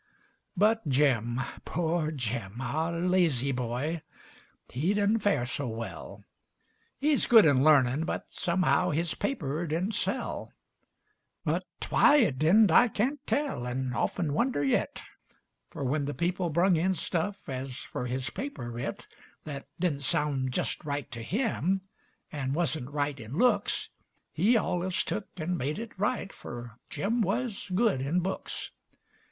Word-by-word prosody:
But 220 -2 +3
Jim 130 -4 +2 0.2
poor 165 -1 0
Jim! 120 -6 -3
our 160 +5 -1
lazy 170 -8 +2
boy 125 +6 -2 0.7
He 160 +11 0
did'nt 210 +2 +2
fare 200 -12 +2
so 130 +2 -3
well; 115 0 -6 0.7
He's 295 0 +2
good 225 -3 +8
in 140 -4 +5
larnin', 140 -1 +5
but, - - -3
somehow, 180 0 +1
His 165 +1 0
paper 165 - -2
didn't 175 +8 -1
sell. - - -2 0.9
But - - 0 0.2
why - - +6
it 200 - +3
didn't 190 +5 +5
I 245 - +7
can't 245 +7 -1
tell, 280 - -1
And 130 0 -2
of'n 155 +4 0
wonder 235 - +1
yit; 135 - 0 0.7
Fer - - -6
when 140 +2 0
the 145 - -3
people 175 +1 0
brung 175 +3 +3
in 185 +4 +1
stuff 195 +4 -2
As 130 -2 -5
fer - - -5
his 130 +1 -2
paper 250 - -5
writ 120 +1 -5 0.4
Thet 140 -2 -6
didn't 165 -6 0
sound 140 -2 0
jest - - -2
right 145 -2 -3
to 115 - -6
him, 195 - 0 0.5
And 135 -2 -2
wuzn't 155 -5 -1
right 145 -1 -2
in 115 +6 -7
looks, 215 -3 +2 0.4
He 230 +3 +3
allus 180 -3 0
tuk 210 -1 -3
and 175 +1 -2
made 145 +6 -1
it 225 +1 -6
right, 205 -1 -1
Fer 120 -1 -8 0.2
Jim 230 +4 0
wuz 215 +1 -1
good 210 - +2
in 155 +7 +1
books. 190 +2 -4
160 Hz, 145 wpm, -29 LUFS, 135-195 Hz, 0.9 s, good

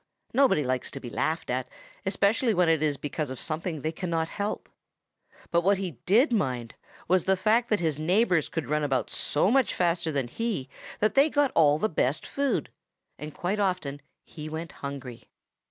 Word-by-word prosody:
Nobody 260 - +4
likes 130 -1 -1
to 140 - -7
be 120 -3 -8
laughed 160 -3 -1
at, 130 0 -1 0.4
especially 210 +4 +2
when 180 -1 +3
it 160 -2 +3
is 150 -2 +1
because 145 0 -3
of 130 -1 -6
something 160 -1 -3
they 155 - -1
cannot 165 -1 -2
help. 205 0 -3 0.8
But 170 - +3
what 195 +3 +3
he 180 -8 -5
did 240 - +4
mind 125 - -1 0.3
was 185 0 +3
the 190 0 +3
fact 220 +5 +2
that 210 - +2
his 160 -4 -1
neighbors 180 +1 +2
could 165 -3 -3
run 150 +4 0
about 135 -3 0
so 165 +8 +1
much 265 -5 +2
faster 170 -2 +1
than 135 -4 -1
he 200 - -3 0.3
that 215 - +3
they 280 +3 +5
got 290 -2 +2
all 150 -2 +5
the 215 - +1
best 150 -5 0
of - - -8
the - - -17
food, 280 -1 0 0.5
and 150 0 -6
quite 185 +7 -2
often 180 -8 -1 0.2
he 155 0 -8
went 160 +1 -5
hungry. 135 -4 -8
165 Hz, 190 wpm, -27 LUFS, 145-200 Hz, 0.8 s, they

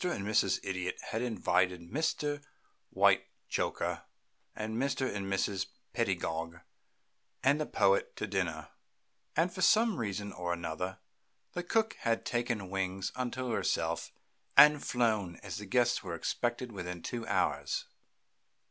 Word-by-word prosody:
and 175 - -1
Mrs. 100 -2 +3
Idiot 90 -1 -2
had 110 - -1
invited 90 -7 +1
Mr. 150 -1 0 0.5
Whitechoker - - +1 0.5
and 110 +1 -3
Mr. 135 +3 0
and 100 -1 -3
Mrs. 95 0 0 0.3
Pedagog 85 +1 -1 0.8
and 140 +3 +4
the 150 - -1
Poet - - +2
to - - -2
dinner, - - -2 0.7
and - - +2
for - - -5
some 220 -3 +5
reason 100 -3 -3
or 90 -1 -2
another 85 +2 -3 0.6
the 175 - -2
cook 220 +5 +1
had 115 -1 0
taken 120 -5 -1
wings 95 0 -1
unto 130 0 -2
herself - - 0 0.5
and 150 +1 +9
flown, 110 -7 +1
and 95 -3 -6
the 105 +3 -5
guests 125 +2 +3
were 90 -4 -4
expected 120 +7 -1
within 90 -4 -6
two 120 -2 -4
hours. - - 0
110 Hz, 130 wpm, -32 LUFS, 95-130 Hz, 0.8 s, and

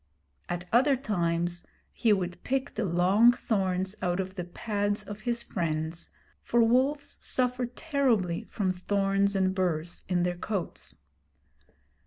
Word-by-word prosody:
At 175 0 -3
other 270 +4 +5
times 175 -7 -1 0.3
he 230 - +2
would 180 -3 -1
pick 270 +2 -1
the 220 - -1
long 190 +7 +5
thorns 190 -5 -1
out 175 +1 0
of 190 0 -3
the 180 -2 -4
pads 205 +3 -2
of 205 0 -8
his 235 0 0
friends, 160 -4 -2 0.3
for 235 0 +3
wolves 265 +5 +2
suffer 250 -1 +1
terribly 245 - 0
from 190 -4 -1
thorns 195 +1 +1
and 190 -1 +2
burs 170 -3 -1
in 175 -1 +2
their 175 0 -1
coats. 195 -1 -4
195 Hz, 135 wpm, -28 LUFS, 175-235 Hz, 0.3 s, other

